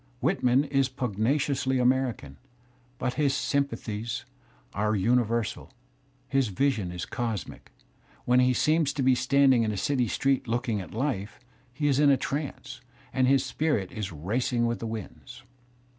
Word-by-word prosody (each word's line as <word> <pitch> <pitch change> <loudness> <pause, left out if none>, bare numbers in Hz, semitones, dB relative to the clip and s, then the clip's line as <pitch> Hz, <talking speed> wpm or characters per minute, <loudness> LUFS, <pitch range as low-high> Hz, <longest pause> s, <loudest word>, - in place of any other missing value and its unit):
Whit, - - 0
man 125 +3 +4
is 135 -2 +1
pugnaciously 130 +3 0
American, 125 - 0 0.6
but 125 - -2
his 140 -2 +2
sympathies 115 -6 -2 0.5
are 105 +2 0
univer 115 +2 +2
sal, - - -9 0.6
his 135 -2 +1
vision 105 -3 0
is 90 -1 -5
cosmic; 115 -5 -5 0.5
when 125 +1 +4
he 125 0 +4
seems 155 +3 +2
to 140 - -1
be 130 0 +5
standing 130 0 +4
in 110 -1 0
a 105 - -4
city 125 +3 +1
street 135 +3 0
looking 115 -2 -1
at 90 - -10
life, 110 -6 -2 0.3
he 145 +4 -4
is 140 -2 +3
in 145 -1 +5
a 135 - +5
trance, 135 -2 -5 0.3
and 130 0 +2
his 135 0 +3
spirit 130 - -1
is 105 -3 -5
racing 120 - -1
with 120 0 -1
the 115 - -4
winds. 115 +3 -8
125 Hz, 155 wpm, -27 LUFS, 110-135 Hz, 0.6 s, be